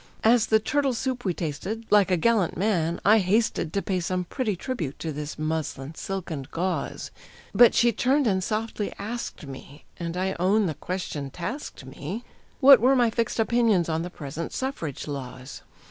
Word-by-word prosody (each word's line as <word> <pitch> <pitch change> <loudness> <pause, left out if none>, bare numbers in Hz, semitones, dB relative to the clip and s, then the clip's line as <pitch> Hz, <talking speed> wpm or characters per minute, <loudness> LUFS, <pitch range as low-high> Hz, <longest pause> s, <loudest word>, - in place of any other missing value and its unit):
As 225 0 +5
the 220 - +5
turtle 275 +3 0
soup 255 0 -2
we 180 -3 0
tasted, 185 +8 -4
like 205 -3 +5
a 180 - +3
gallant 215 -1 +2
man 175 -4 0
I 215 +2 +7
hasted 200 -3 +1
To 200 - -1
pay 185 -2 -1
some 180 +1 -1
pretty 215 +2 -2
tribute 175 - -4
to 160 - -4
this 150 0 -6
muslin, 155 -2 -3
silk, 190 +1 -5
and 140 -4 -5
gauze; 180 +2 -3 0.4
But 240 - +7
she 235 0 +5
turned 265 +6 +2
and 190 -4 +1
softly 215 0 -2
asked 225 -5 -5
me 140 +1 -11
and 170 0 -4
I 190 +1 -1
own 200 +4 +3
the 160 - -1
question 150 -4 -4
tasked 175 - -6
me 150 - -6 0.4
What 275 -1 +9
were 255 +4 +4
my 240 -3 +3
fixed 230 0 -1
opinions 225 -6 +2
on 160 0 0
the 175 - -4
present 155 0 -6
Suffrage 215 - -4
laws. 130 -2 -7
190 Hz, 175 wpm, -26 LUFS, 160-230 Hz, 0.4 s, What